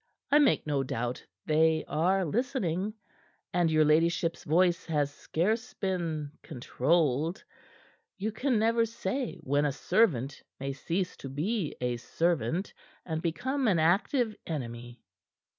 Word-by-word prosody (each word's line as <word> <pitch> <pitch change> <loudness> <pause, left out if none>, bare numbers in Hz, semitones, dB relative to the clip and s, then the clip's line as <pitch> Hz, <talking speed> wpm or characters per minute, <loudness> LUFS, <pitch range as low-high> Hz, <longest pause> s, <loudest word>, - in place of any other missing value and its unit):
I 295 - +7
make 290 - +3
no 145 -2 +1
doubt 125 -1 -3 0.2
they 160 +1 +3
are 185 +4 +2
listening, 210 - -1 0.6
and 175 -2 +3
your 155 -1 +4
ladyship's 165 +2 +2
voice 175 +2 +2
has 145 -3 0
scarce 220 +12 -1
been 165 -6 -2
controlled. 155 - 0 0.7
You 210 +3 -2
can 250 +3 0
never 230 +1 +3
say 230 +2 -3
when 145 +2 +1
a 145 - +2
servant 140 - +1 0.2
may 135 +1 -3
cease 175 +6 -2
to 135 - -7
be 165 - -2
a 125 -1 -1
servant, 165 - -1 0.3
and 160 -2 -3
become 260 - -1
an 190 -5 +3
active 210 - +2
enemy." 120 -5 -6
165 Hz, 125 wpm, -29 LUFS, 145-205 Hz, 0.7 s, I